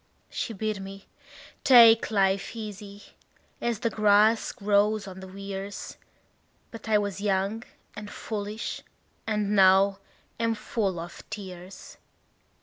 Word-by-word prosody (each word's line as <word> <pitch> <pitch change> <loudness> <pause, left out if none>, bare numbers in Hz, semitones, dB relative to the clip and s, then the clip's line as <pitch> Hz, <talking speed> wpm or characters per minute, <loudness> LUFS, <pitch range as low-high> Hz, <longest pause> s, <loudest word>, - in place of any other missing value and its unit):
She 230 - -3
bid 215 0 -3
me 195 0 -9 0.6
take 230 -4 +7
life 195 0 +1
easy, 205 -2 -8 0.6
as 235 -3 -1
the 230 - 0
grass 215 +1 +3
grows 205 0 +1
on 190 -1 -9
the 190 - -9
weirs; 195 +1 -7 0.7
But 230 -1 -9
I 215 - +5
was 200 -1 -3
young 200 +2 0 0.3
and 210 -1 -8
foolish, 210 0 -5 0.5
and 210 -1 0
now 195 +1 +5 0.4
am 230 -1 +1
full 210 -3 -2
of 170 +1 -8
tears. 185 -2 -9
205 Hz, 120 wpm, -27 LUFS, 195-215 Hz, 0.7 s, take